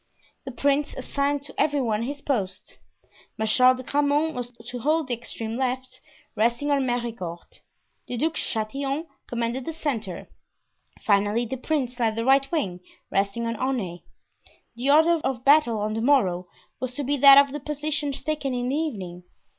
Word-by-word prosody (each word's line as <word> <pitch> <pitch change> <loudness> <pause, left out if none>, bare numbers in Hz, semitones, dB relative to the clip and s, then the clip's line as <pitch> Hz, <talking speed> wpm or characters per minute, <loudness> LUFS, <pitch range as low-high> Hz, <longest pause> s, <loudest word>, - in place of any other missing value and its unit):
The 265 - -5
prince 285 +3 0
assigned 280 0 -1
to 285 - -10
every 290 -1 +2
one 225 -4 0
his 280 +4 -4
post. 215 -11 -3 0.6
Marshal 250 +4 +4
de 255 - -8
Grammont 290 +4 +1
was 245 -2 -4 0.2
to 245 - -5
hold 305 +3 +1
the - - 0
extreme 230 -1 -5
left, 255 0 -3 0.3
resting 235 +6 +1
on 275 -2 +2
Mericourt. 230 -8 -4 0.5
The 245 - -4
Duc 320 +6 0
de - - -3
Chatillon 275 +7 -2 0.2
commanded 240 +2 -2
the 325 - -4
centre. 230 - -3 0.8
Finally, 205 +3 +2
the 265 +3 -4
prince 255 -2 -2
led 225 -2 +1
the 230 +1 -2
right 270 +1 +4
wing, 195 - -1 0.3
resting 200 +4 0
on 230 0 -2
Aunay. 215 -9 -2 0.7
The 250 +4 -1
order 320 +3 +5
of 255 -2 -2
battle 275 -6 +5
on 210 +1 -1
the 225 - -2
morrow 195 -10 +2 0.3
was 255 -1 -4
to 290 - -2
be 285 +2 0
that 275 0 +9
of 280 -1 +6
the 295 - -4
positions 295 -1 -3
taken 285 -3 -2
in 245 0 -1
the 270 - 0
evening. 195 - -4
255 Hz, 170 wpm, -25 LUFS, 230-285 Hz, 0.8 s, that